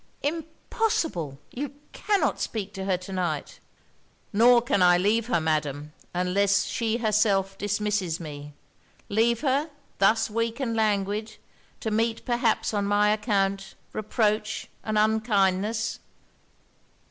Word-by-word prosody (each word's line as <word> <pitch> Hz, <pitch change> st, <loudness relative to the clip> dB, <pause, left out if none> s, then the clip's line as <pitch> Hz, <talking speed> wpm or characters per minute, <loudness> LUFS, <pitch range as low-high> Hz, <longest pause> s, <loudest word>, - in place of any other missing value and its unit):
'Impossible! 315 Hz, -, -2 dB
you 280 Hz, +2 st, -5 dB, 0.2 s
cannot 410 Hz, -2 st, 0 dB
speak 205 Hz, -3 st, -3 dB
to 190 Hz, 0 st, -5 dB
her 190 Hz, -2 st, +1 dB
to 185 Hz, +2 st, -9 dB
night.' 175 Hz, -6 st, -3 dB, 0.7 s
'Nor 240 Hz, +3 st, +6 dB
can 240 Hz, -6 st, +1 dB
I 180 Hz, -1 st, +6 dB
leave 215 Hz, +5 st, +1 dB
her, 235 Hz, -8 st, +2 dB
Madam, 150 Hz, -2 st, -2 dB, 0.2 s
unless 185 Hz, +2 st, +2 dB
she 230 Hz, -1 st, -1 dB
herself 210 Hz, -4 st, +2 dB
dismisses 205 Hz, -4 st, -1 dB
me. 145 Hz, -2 st, -8 dB, 0.6 s
Leave 230 Hz, +3 st, +2 dB
her, 285 Hz, +2 st, +1 dB, 0.3 s
thus 215 Hz, +3 st, +4 dB
weak 230 Hz, +2 st, -2 dB
and 235 Hz, -4 st, -1 dB
languid, 215 Hz, 0 st, 0 dB, 0.4 s
to 220 Hz, -, -2 dB
meet 225 Hz, +1 st, 0 dB
perhaps 240 Hz, -2 st, +1 dB
on 205 Hz, -1 st, 0 dB
my 205 Hz, +1 st, +3 dB
account 200 Hz, -3 st, 0 dB, 0.2 s
reproach 215 Hz, 0 st, -1 dB, 0.2 s
and 215 Hz, -1 st, -1 dB
unkindness!' 215 Hz, 0 st, +1 dB
210 Hz, 120 wpm, -26 LUFS, 195-230 Hz, 0.7 s, Nor